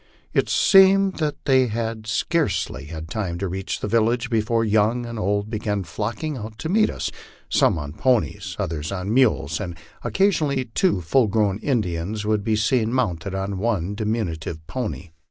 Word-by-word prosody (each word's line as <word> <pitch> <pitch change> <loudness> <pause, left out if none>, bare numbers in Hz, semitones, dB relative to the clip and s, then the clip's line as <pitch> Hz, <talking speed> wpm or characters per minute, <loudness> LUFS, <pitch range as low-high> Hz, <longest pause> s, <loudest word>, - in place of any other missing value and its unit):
It - - +2
seemed 195 -1 +5
that 150 -2 0
they 130 -2 +4
had 110 -1 -3
scarcely 105 - 0
had 80 +1 -7
time 90 -3 -3
to 95 +2 -2
reach 95 +1 -4
the - - -2
village, 115 +3 +1
before 115 0 +1
young 110 +3 +2
and 115 -1 -6
old 100 +1 -1
began 105 -2 -1
flocking 115 - -4
out 110 0 -8
to 160 - -4
meet 215 +4 +3
us, - - -3 0.4
some - - +3
on 75 -1 -5
ponies, 100 -4 0
others 80 -6 -3
on 100 +2 -2
mules, 130 -3 +2
and 90 -5 -5 0.3
occasionally 155 -9 +1
two 185 - +2
full 115 +8 +3
grown 100 -1 +1
Indians 105 - -1
would 105 -1 +1
be 110 0 +1
seen 110 +1 +1
mounted 100 -7 -1
on 95 0 -3
one 100 -4 0
diminutive 95 -8 -3
pony. 105 -6 -5
110 Hz, 165 wpm, -23 LUFS, 95-125 Hz, 0.4 s, seemed